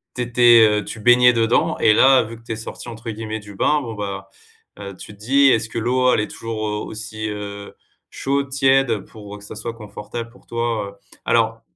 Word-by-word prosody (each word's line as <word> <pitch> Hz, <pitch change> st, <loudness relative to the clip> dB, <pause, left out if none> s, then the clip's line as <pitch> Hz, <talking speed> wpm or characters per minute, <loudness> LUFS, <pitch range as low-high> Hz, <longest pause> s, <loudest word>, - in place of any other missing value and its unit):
tu 125 Hz, -, -2 dB
étais, 120 Hz, -1 st, +5 dB
heu, 105 Hz, 0 st, 0 dB
tu 110 Hz, -, -8 dB
baignais 125 Hz, +2 st, +5 dB
dedans 115 Hz, 0 st, +1 dB
et 105 Hz, -, +4 dB
là, 130 Hz, +2 st, +5 dB
vu 115 Hz, +1 st, -9 dB
que 115 Hz, -, -20 dB
tu 115 Hz, -, -5 dB
es -, -, -4 dB
sortie, 115 Hz, +2 st, -8 dB
entre 115 Hz, 0 st, -7 dB
guillemets, 110 Hz, 0 st, -5 dB
du 105 Hz, -1 st, -12 dB
bain, 150 Hz, +8 st, +1 dB
bon, 115 Hz, -4 st, -6 dB
bah, 100 Hz, -2 st, -6 dB, 0.5 s
heu, 100 Hz, -1 st, -8 dB
tu 105 Hz, -, -11 dB
te 100 Hz, -, -20 dB
dis: 135 Hz, +4 st, +4 dB
«Est-ce 110 Hz, 0 st, 0 dB
que -, -, -7 dB
l'eau, 125 Hz, +2 st, +2 dB
elle -, -, +2 dB
est -, -, -3 dB
toujours 110 Hz, -2 st, -4 dB
aussi, 110 Hz, 0 st, -6 dB
heu, 100 Hz, -1 st, -7 dB, 0.4 s
chaude, 140 Hz, 0 st, -2 dB
tiède» 135 Hz, -4 st, +2 dB
pour 105 Hz, -1 st, -11 dB
que 100 Hz, -, -16 dB
ça 105 Hz, -, -10 dB
soit 115 Hz, +2 st, -5 dB
confortable 115 Hz, +1 st, -8 dB
pour 120 Hz, -, -21 dB
toi, 115 Hz, -3 st, -2 dB
heu. -, -, -23 dB
Alors 115 Hz, -1 st, +1 dB
115 Hz, 215 wpm, -20 LUFS, 105-120 Hz, 0.5 s, étais